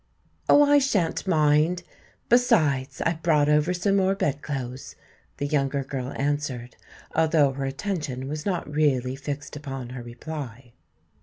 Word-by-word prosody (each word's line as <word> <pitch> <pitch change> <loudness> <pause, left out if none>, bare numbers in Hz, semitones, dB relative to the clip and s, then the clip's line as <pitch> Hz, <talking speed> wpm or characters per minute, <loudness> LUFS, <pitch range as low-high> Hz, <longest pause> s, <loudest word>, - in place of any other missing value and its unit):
"Oh, 290 - +8
I 290 0 +5
shan't 200 -10 0
mind. 155 +1 +3 0.4
Besides, 155 - +2
I 165 - +2
brought 155 -3 +2
over 150 +3 +3
some 195 +3 +1
more 190 0 +2
bed 150 -8 -1
clothes," 130 -3 -5 0.4
the 145 - -2
younger 140 -1 0
girl 130 -1 -4
answered, 140 -4 -2 0.4
although 155 -3 +3
her 135 0 -4
attention 135 -3 -3
was 150 +1 -4
not 185 -3 -2
really 140 -4 +1
fixed 145 +1 -6
upon 135 -4 -6
her 125 0 -7
reply. 120 -1 -8
145 Hz, 140 wpm, -25 LUFS, 135-165 Hz, 0.4 s, Oh